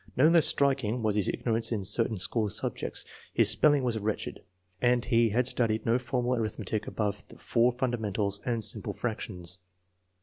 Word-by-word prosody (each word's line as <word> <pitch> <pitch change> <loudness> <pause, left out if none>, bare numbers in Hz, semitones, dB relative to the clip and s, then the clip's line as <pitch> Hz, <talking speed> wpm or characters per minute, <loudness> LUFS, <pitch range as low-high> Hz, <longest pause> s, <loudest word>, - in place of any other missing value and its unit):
No 135 +5 +6
less 165 -1 +6
striking 130 -5 +1
was 110 -1 +1
his 105 -3 +1
ignorance 115 -1 -1
in 105 -4 -1
certain 115 +3 +1
school 105 +3 +1
subjects. 105 - -2 0.3
His 110 -2 +5
spelling 145 +4 +3
was 120 -3 -1
wretched, 110 0 -4 0.4
and 120 -1 +2
he 115 -2 +3
had 120 +4 +1
studied 110 -4 0
no 115 +2 +2
formal 125 0 -1
arithmetic 110 -2 -3
above 105 -1 -3
the - - -15
four 120 +1 +2
fundamentals 110 -5 -1
and 120 -3 -1
simple 105 -1 -2
fractions. 90 -6 -3
115 Hz, 165 wpm, -28 LUFS, 105-125 Hz, 0.4 s, No